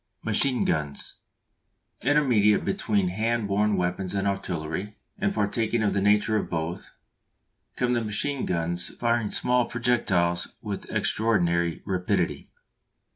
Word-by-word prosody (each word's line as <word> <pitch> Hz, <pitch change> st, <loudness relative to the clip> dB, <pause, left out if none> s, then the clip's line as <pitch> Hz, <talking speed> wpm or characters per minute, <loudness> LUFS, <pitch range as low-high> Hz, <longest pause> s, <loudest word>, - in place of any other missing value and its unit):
MACHINE 125 Hz, +4 st, +1 dB
GUNS. 75 Hz, -3 st, -2 dB, 0.8 s
Intermediate 120 Hz, -8 st, +3 dB
between 100 Hz, -1 st, 0 dB
hand 110 Hz, +3 st, 0 dB
borne 105 Hz, +1 st, +1 dB
weapons 90 Hz, +2 st, -2 dB
and 100 Hz, 0 st, 0 dB
artillery, 95 Hz, 0 st, -3 dB, 0.2 s
and -, -, +1 dB
partaking 110 Hz, +2 st, 0 dB
of 105 Hz, -, +1 dB
the 100 Hz, -, +1 dB
nature 105 Hz, +2 st, +3 dB
of -, -, -3 dB
both, 85 Hz, +3 st, -3 dB, 0.9 s
come 125 Hz, -1 st, +1 dB
the 120 Hz, -1 st, +1 dB
machine 125 Hz, +6 st, -2 dB
guns 85 Hz, 0 st, -2 dB
firing 115 Hz, -2 st, 0 dB
small 125 Hz, +2 st, +2 dB
projectiles 100 Hz, -9 st, 0 dB
with -, -, -6 dB
extraordinary 85 Hz, -6 st, +1 dB
rapidity. 90 Hz, -2 st, -1 dB
105 Hz, 120 wpm, -26 LUFS, 90-115 Hz, 0.9 s, Intermediate